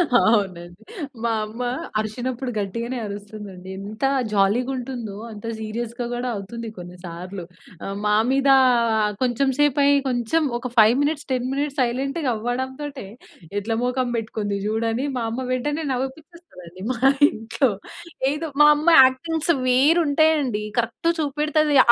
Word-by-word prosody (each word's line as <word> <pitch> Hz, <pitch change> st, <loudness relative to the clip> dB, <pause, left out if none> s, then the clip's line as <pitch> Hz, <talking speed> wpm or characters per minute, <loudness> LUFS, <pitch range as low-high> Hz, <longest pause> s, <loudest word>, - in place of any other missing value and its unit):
అవు‌నండి. 190 Hz, -5 st, +1 dB, 0.4 s
మా 235 Hz, -, +1 dB
అమ్మ 225 Hz, +4 st, -6 dB, 0.4 s
అరిచినప్పుడు 245 Hz, +4 st, -3 dB
గట్టిగానే 230 Hz, +5 st, -3 dB
అరుస్తుంది 205 Hz, 0 st, -8 dB
అండి. 180 Hz, +1 st, -12 dB
ఎంత 210 Hz, +5 st, -8 dB, 0.3 s
జాలీగా 215 Hz, +6 st, +2 dB
ఉంటుందో, 240 Hz, -5 st, -5 dB, 0.2 s
అంత 210 Hz, 0 st, -10 dB
సీరియస్‌గా 235 Hz, +2 st, -4 dB
కూడా, 245 Hz, +1 st, -3 dB
అవుతుంది 225 Hz, +4 st, -6 dB
కొన్నిసార్లు. 180 Hz, +1 st, -8 dB, 0.4 s
ఆహ్, 195 Hz, 0 st, -4 dB
మా 210 Hz, 0 st, +3 dB
మీద 275 Hz, +1 st, +2 dB, 0.7 s
కొంచెం 255 Hz, +2 st, +1 dB
సేపు 290 Hz, -1 st, +3 dB
అయి 285 Hz, 0 st, +5 dB
కొంచెం 245 Hz, +6 st, +1 dB, 0.2 s
ఒక 250 Hz, +1 st, -5 dB
5 220 Hz, +1 st, +7 dB
మినిట్స్, 295 Hz, 0 st, -1 dB
10 255 Hz, -1 st, 0 dB
మినిట్స్, 285 Hz, +1 st, -2 dB
సైలెంట్‌గా 270 Hz, +4 st, -1 dB
అవ్వడంతోటే 260 Hz, +4 st, -4 dB, 0.5 s
"ఎట్లా 225 Hz, +3 st, -2 dB
మోఖం 250 Hz, 0 st, 0 dB
పెట్టుకుంది 215 Hz, -3 st, -3 dB
చూడని," 225 Hz, +4 st, -1 dB
మా 235 Hz, -, -1 dB
అమ్మ 255 Hz, +3 st, -3 dB
వెంటనే 295 Hz, +5 st, -1 dB
నవ్విపించేస్తది 270 Hz, -, -7 dB
అండి. 185 Hz, +3 st, -11 dB
మా 240 Hz, -, -8 dB, 0.3 s
ఇంట్లో 230 Hz, +5 st, 0 dB, 0.6 s
ఏదో 300 Hz, +3 st, -3 dB
మా 295 Hz, -, +9 dB
అమ్మ 300 Hz, +3 st, -4 dB, 0.2 s
యాక్టింగ్స్ 320 Hz, +6 st, +1 dB, 0.2 s
వేరు 275 Hz, +7 st, +4 dB
ఉంటాయి 315 Hz, +2 st, +4 dB
అండి, 225 Hz, -6 st, -2 dB, 0.2 s
కరెక్ట్ 235 Hz, +8 st, -1 dB
చూపెడతది 300 Hz, 0 st, +1 dB
245 Hz, 135 wpm, -23 LUFS, 215-275 Hz, 0.7 s, మా